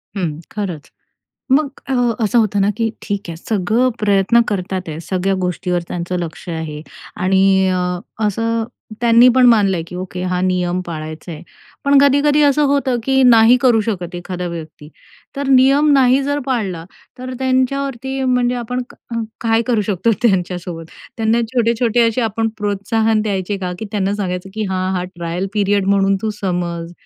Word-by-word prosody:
हं, 165 -6 -3
खरंच. 185 -8 -5 0.6
मग 290 +2 +3 0.2
अ, - - -1 0.3
असं 230 +3 +2
होतं 210 -3 +1
ना, 195 - +3
की 225 -1 0
ठीक 205 -1 -3
आहे, 165 - -5
सगळं 215 +7 0
प्रयत्न 205 +2 +3
करत 190 -2 -3
आहेत, 170 -4 -4
सगळ्या 190 +1 -1
गोष्टीवर 180 0 -1
त्यांचं 175 +1 -3
लक्ष 170 0 -6
आहे 160 -3 -5 0.4
आणि 190 0 +3
अ, 185 0 0 0.5
असं 230 +2 -1 0.4
त्यांनी 235 +1 +6
पण 255 -1 +5
मानलं 205 -5 +4
आहे, 165 - -3
की 180 - -10
"ओके, 180 0 -5
हा 180 0 -1
नियम 180 -1 0
पाळायचा 155 0 -7
आहे." 155 +1 -9 0.4
पण 280 0 +5
कधी-कधी 285 +1 +4
असं 290 +1 +3
होतं, 275 -3 +1
की 265 +1 +3
नाही 235 -1 +6
करू 245 -4 +4
शकत 185 -5 -4
एखादा 180 0 -5
व्यक्ती. 160 -3 -9 0.5
तर 280 0 -3
नियम 275 +3 +5
नाही 265 -1 +4
जर 285 +1 -1
पाळला, 200 -11 -2 0.3
तर 255 +1 -6
अ, - - -5
त्यांच्यावरती 265 0 -1
म्हणजे 250 -1 +1
आपण 250 +1 -3
का - - -15 0.2
अ, - - 0 0.2
काय 225 0 +2
करू 240 -4 +2
शकतो 205 +4 +1
त्यांच्यासोबत. 180 -5 -1 0.3
त्यांना 225 +1 +1
छोटे-छोटे 235 0 +2
असे 230 +3 -1
आपण 225 0 0
प्रोत्साहन 215 +2 0
द्यायचे 200 -1 -2
का? 180 -2 -3
की - - -5
त्यांना 200 -1 -1
सांगायचं, 190 -2 -4
की 220 0 -2
हां, 185 0 -1
हा 180 - -2
ट्रायल 175 0 -4
पीरियड 200 -1 +1
म्हणून 195 0 +3
तू 220 - -1
समज. 175 -3 -3
205 Hz, 170 wpm, -18 LUFS, 180-245 Hz, 0.6 s, त्यांनी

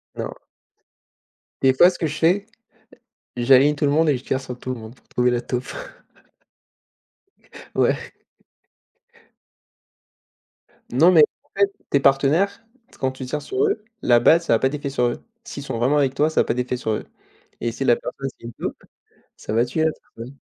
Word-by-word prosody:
Non. - - -4 1.3
Des 130 -1 +5
fois 175 +7 +7
ce - - -11
que 160 - 0
je 150 +1 -5
fais, 185 +5 +2 0.9
j'aligne 135 +4 +5
tout 145 - 0
le 140 - +2
monde 155 +1 +3
et 135 - +2
je 125 - -13
tire 130 - -2
sur 125 -2 -8
tout 130 - -4
le 120 - -8
monde 110 +3 -11
pour - - -30
trouver 125 0 +1
la 120 -1 0
taupe. 125 +1 -4 2.0
Ouais. - - 0 2.8
Non, 160 +9 +5
mais 160 -4 +7 0.2
en 200 - -14
fait, 200 0 +4 0.2
tes 140 - +3
partenaires, 150 +10 +2 0.4
quand 130 - 0
tu 130 0 -8
tires 150 +4 -3
sur 395 - -1
eux, 405 - -1 0.2
la 120 -1 +4
balle 160 +8 +5
ça 170 - +1
a - - +1
pas 130 - +2
d'effet 145 0 -4
sur 125 -3 0
eux. 120 - -2 0.2
S'ils 185 -11 -8
sont 125 - -4
vraiment 130 +6 +2
avec 135 -3 +2
toi, 150 +2 +2
ça - - +2
a - - +2
pas - - -1
d'effet 125 +1 -2
sur 110 - -3
eux. 105 - -3 0.6
Et 120 0 -2
si 135 +4 -4
la 120 - +4
personne 135 - -6
c'est - - -19
une 120 - -7
taupe, - - -5 0.6
ça - - -6
va 115 +2 +3
tuer 155 +6 -1
la 160 - +3 0.3
personne. 125 +5 -10
135 Hz, 190 wpm, -22 LUFS, 125-155 Hz, 2.8 s, fois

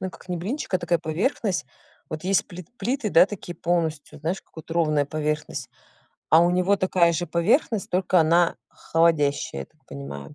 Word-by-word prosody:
ну 185 0 -3
как, 185 - -16
не 180 - -2
блинчик, 210 - -4
а 185 - +4
такая 175 -1 0
поверхность. 180 - -1 0.4
Вот 155 +2 -6
есть 195 +1 +2
плит 180 -2 -10
плиты, 235 +1 -1
да, 180 - +7
такие 190 -4 -7
полностью, 160 -4 -2
знаешь, 170 +5 -2
как - - -37
вот 160 - -11
ровная 155 -3 +2
поверхность? 150 +1 -3 0.6
А 160 - +7
у 175 - +3
него 180 +3 +2
такая 185 -3 +3
же 175 +1 -2
поверхность, 195 - +1
только 180 0 +3
она 170 +2 +3
холодящая, 150 - +1
я - - -13
так - - -37
понимаю. 70 0 -8
170 Hz, 180 wpm, -24 LUFS, 155-185 Hz, 0.6 s, да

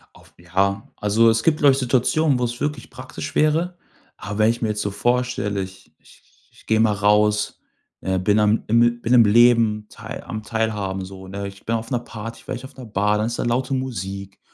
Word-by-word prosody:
Auf - - -20
Ja, 95 +4 -1
also, 110 +3 +3
es 115 0 +2
gibt 155 +2 +2
vielleicht 140 -2 +5
Situationen, 130 +3 +2
wo 125 - -1
es 120 0 -3
wirklich 150 +1 -3
praktisch 130 +2 -8
wäre, 165 +4 +1 0.4
aber 105 0 -6
wenn 110 +1 +5
ich 115 - -6
mir 115 - 0
jetzt 105 0 -2
so 100 - -2
vorstelle, 120 -2 0
ich 95 0 -10
ich - - -21 0.3
ich - - -22
gehe 110 0 +2
mal 110 -1 +3
raus, 105 +1 +2 0.4
äh, 95 0 -1
bin 105 +3 +2
am 105 +1 +2
im 120 +1 +3
bin 120 - 0
im 120 -2 +7
Leben 115 -1 +4
teil - - -9
am 110 - -6
Teilhaben 105 -3 -2
so, 95 0 -10
ne? 100 +1 -5
Ich 100 0 -12
bin 115 - 0
auf 115 0 -4
'ner 125 - 0
Party, 115 -1 -9
vielleicht 125 -1 -5
auf 130 - -11
'ner 130 -2 -9
Bar, 105 -1 +1
dann 105 - 0
ist 120 +1 -3
da - - 0
laute 125 +3 0
Musik 100 -6 -5
110 Hz, 210 wpm, -22 LUFS, 105-125 Hz, 0.4 s, im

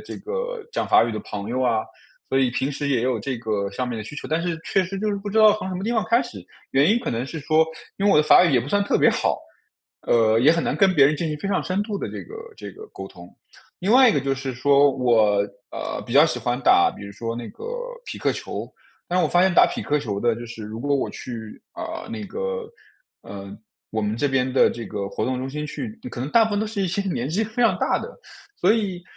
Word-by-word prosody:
这 - - -8
个 485 0 -5
讲 - - -1
法 - - +6
语 115 - -3
的 110 - -4
朋 105 0 -6
友 130 +2 -1
啊。 115 -3 +1 0.4
所 135 - +1
以 130 -2 +3
平 135 +3 -1
时 145 +1 -3
也 130 -5 +1
有 125 -3 0
这 130 +3 -3
个 105 -4 -2
上 125 +6 -3
面 120 -2 -4
的 - - -4
需 150 +8 -9
求， - - -6
但 160 +2 0
是， 170 -1 -2
确 195 - +2
实 190 +2 -5
就 215 +1 -1
是 200 - -1
不 200 +1 -6
知 205 - -4
道 215 -1 +7
从 190 - -5
什 185 - -4
么 185 +2 -4
地 235 - 0
方 220 - +2
开 235 +2 +4
始。 240 - -9 0.3
原 140 +3 +4
因 230 - +4
可 245 - -4
能 120 +3 -2
是 160 - -6
说， 155 +2 +1 0.4
因 200 - +1
为 - - +5
我 - - +5
的 150 - +6
法 155 - +7
语 175 - +3
也 - - +5
不 120 - -3
算 200 +7 +1
特 200 - +1
别 - - +5
好， - - 0 0.7
呃， 115 -1 +4
也 140 - +6
很 165 0 +1
难 - - 0
跟 195 -2 +3
别 140 -4 +6
人 150 - +4
进 160 +2 -2
行 150 - -3
非 150 - -5
常 195 -1 0
深 185 +2 -1
度 205 -2 -4
的 - - -4
这 - - -7
个 - - -11 0.2
这 - - -8
个 435 - -11
沟 - - -8
通。 - - -13 0.5
另 195 +5 +1
外 255 0 +8
一 - - +3
个 - - +3
就 135 0 -1
是 135 -1 -5
说， 140 +2 +4
我， 110 -6 +3 0.3
呃， - - -4
比 120 - -5
较 145 +3 +8
喜 155 -7 -1
欢 120 +1 -1
打 120 -9 +5
比 100 - -9
如 100 - -9
说 115 +2 -4
那 120 -1 -6
个 - - -12 0.4
匹 - - -6
克 - - 0
球， - - -5 0.4
但 180 - 0
是 - - +4
我 - - +2
发 175 - +4
现 190 -1 +3
打 - - +5
匹 - - -4
克 150 0 +1
球 105 -7 -3
的 115 +2 +2
就 120 +1 -8
是 115 -1 -9
如 110 +2 -7
果 140 +2 +1
我 135 - -2
去， 115 -4 -8
呃， - - -6
那 225 -2 -5
个 475 - -4 0.5
呃， 100 0 -9 0.4
我 110 - -1
们 105 +1 -1
这 145 +5 +1
边 135 -1 +1
的 130 - +4
这 120 -1 -6
个 100 -2 -4
活 - - -4
动 130 0 -1
中 130 +1 -4
心 150 +2 -4
去， 220 +8 -5 0.2
可 - - -8
能 130 +4 -3
大 230 +5 +5
部 - - -5
分 205 - +1
都 220 - -1
是 210 -1 -4
一 190 - 0
些 190 +3 -1
年 170 -10 -2
纪 200 +8 0
非 225 +3 -2
常 230 - +4
大 - - +1
的。 485 - -9 0.4
所 200 - +4
以， 195 -6 -2
145 Hz, 300 characters per minute, -23 LUFS, 120-200 Hz, 0.7 s, 外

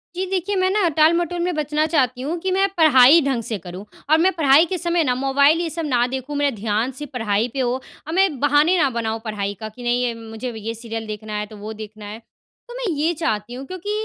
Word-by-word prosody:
जी 375 - -2
देखिए 385 +2 -1
मैं 370 0 +2
ना 405 -4 +2
टाल-मटोल 340 +2 +3
में 360 0 -1
बचना 300 0 0
चाहती 260 -6 0
हूँ 315 +6 -3
कि 380 +2 -2
मैं 390 +1 +3
पढ़ाई 300 0 +7
ढंग 265 -5 -1
से 220 - -2
करूँ। 180 +3 -9 0.3
और 315 - +6
मैं 370 +4 +3
पढ़ाई 310 0 +5
के 365 +2 -3
समय 345 -1 +1
ना 250 -3 0
मोबाइल 280 +4 +3
ये 335 - -2
सब 325 0 -3
ना 245 -4 +2
देखूँ 265 +3 -5
मेरा 285 -4 +1
ध्यान 215 +4 -1
सिर्फ़ 295 -1 -7
पढ़ाई 220 -2 0
पे 270 - -4
हो। 245 -1 +1 0.3
और 320 - -4
मैं 360 -7 +2
बहाने 295 +5 +3
ना 280 -5 +3
बनाऊँ 225 -2 -3
पढ़ाई 205 -2 -3
का 220 - -6
कि 245 +3 -12
नहीं 240 -1 0
मुझे 225 +3 -5
ये 220 +1 -5
सीरियल 225 -1 -6
देखना 215 0 -7
है 210 - -2
तो 215 0 -13
वो 210 +2 -7
देखना 215 -1 -10
है। 215 +3 -8 0.5
तो - - -8
मैं - - -4
ये 310 +4 +1
चाहती 220 -7 -2
हूँ। 265 +2 -7
क्योंकि 370 +4 -6
270 Hz, 240 wpm, -21 LUFS, 225-330 Hz, 0.5 s, पढ़ाई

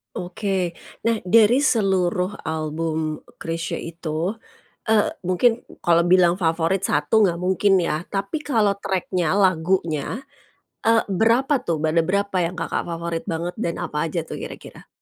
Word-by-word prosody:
Oke. 185 0 -2 0.3
Nah, 230 -1 +1
dari 230 +5 +5
seluruh 190 -6 +1
album 155 0 -2 0.2
Chrisye 165 0 -4
itu, 165 +1 -3 0.6
eee, 220 -1 +3 0.2
mungkin 225 +6 +3 0.2
kalau 170 0 +4
bilang 180 0 +4
favorit 165 +3 +1
1 220 - +2
nggak 170 - -1
mungkin, 190 +3 +2
ya. 155 -2 -1
Tapi 200 +10 -3
kalau 215 -9 +1
track-nya, 185 -3 -1
lagunya, 185 - +1 0.6
eee, 225 0 +5
berapa 235 +8 +3
tuh, 160 -3 -1
ada 165 +1 +3
berapa 200 +1 0
yang 175 0 0
Kakak 165 -2 -3
favorit 170 -1 -4
banget 170 -1 -3
dan 170 -6 -2
apa 150 +2 -2
aja 165 +1 -2
tuh - - -7
kira-kira? - - -10
180 Hz, 135 wpm, -22 LUFS, 165-200 Hz, 0.6 s, dari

